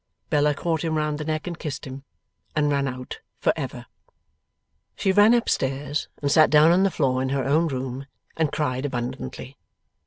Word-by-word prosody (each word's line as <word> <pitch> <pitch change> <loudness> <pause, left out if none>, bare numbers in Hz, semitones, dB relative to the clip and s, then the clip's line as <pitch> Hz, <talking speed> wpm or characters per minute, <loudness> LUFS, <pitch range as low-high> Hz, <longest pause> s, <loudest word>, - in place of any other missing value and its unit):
Bella 150 0 +3
caught 165 +1 -1
him 160 -1 0
round 150 -1 -1
the - - -3
neck 155 0 -2
and 175 -2 -5
kissed 150 -4 -5
him, 135 +1 -9 0.5
and 150 -1 +2
ran 140 -1 +1
out 125 -1 -6 0.2
for - - +2
ever. - - -5 1.1
She 195 - +1
ran 205 +4 +6
up 235 - 0
stairs, 140 +2 -1 0.2
and 140 - +1
sat 155 0 +6
down 155 +2 +6
on 180 +2 +4
the 195 - +4
floor 130 -7 0
in 130 - -1
her 135 0 0
own 155 +5 +2
room, 130 -1 -4 0.3
and 160 -3 0
cried 145 -4 -1
abundantly. 130 0 -5
145 Hz, 185 wpm, -24 LUFS, 135-155 Hz, 1.1 s, ran